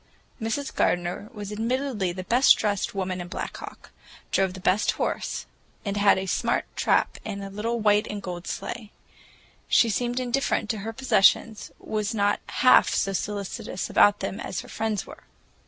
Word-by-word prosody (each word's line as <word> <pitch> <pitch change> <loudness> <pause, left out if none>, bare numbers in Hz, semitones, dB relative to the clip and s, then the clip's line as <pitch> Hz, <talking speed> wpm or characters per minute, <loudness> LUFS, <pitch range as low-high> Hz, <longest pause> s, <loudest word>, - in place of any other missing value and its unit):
Mrs. 225 +6 -2
Gardener 175 +4 0
was 210 -3 -7
admittedly 230 -2 -1
the 185 +1 -6
best 245 +7 +5
dressed 205 -1 -1
woman 185 -2 -2
in 175 - -7
Black - - -5
Hawk, - - -11 0.4
drove 190 -1 +1
the - - -8
best 185 +3 +2
horse, - - -3 0.4
and 200 -1 -2
had 205 -1 +4
a 190 - -2
smart 190 - 0
trap - - +1
and 200 -2 -5
a 195 - -7
little 230 +4 -2
white 210 -1 +3
and 210 - -4
gold 180 -2 -6
sleigh. 230 -3 -5 0.8
She 230 - +4
seemed 245 +3 -1
indifferent 250 -3 0
to 220 - -4
her 220 +3 -4
possessions, 225 -2 +3
was 215 0 -3
not 205 -1 +2
half 255 - +5
so 195 - 0
solicitous 200 -1 -4
about 205 0 +5
them 195 +2 -3
as - - -4
her - - -13
friends 220 -3 -2
were. - - -13
205 Hz, 170 wpm, -26 LUFS, 195-225 Hz, 0.8 s, best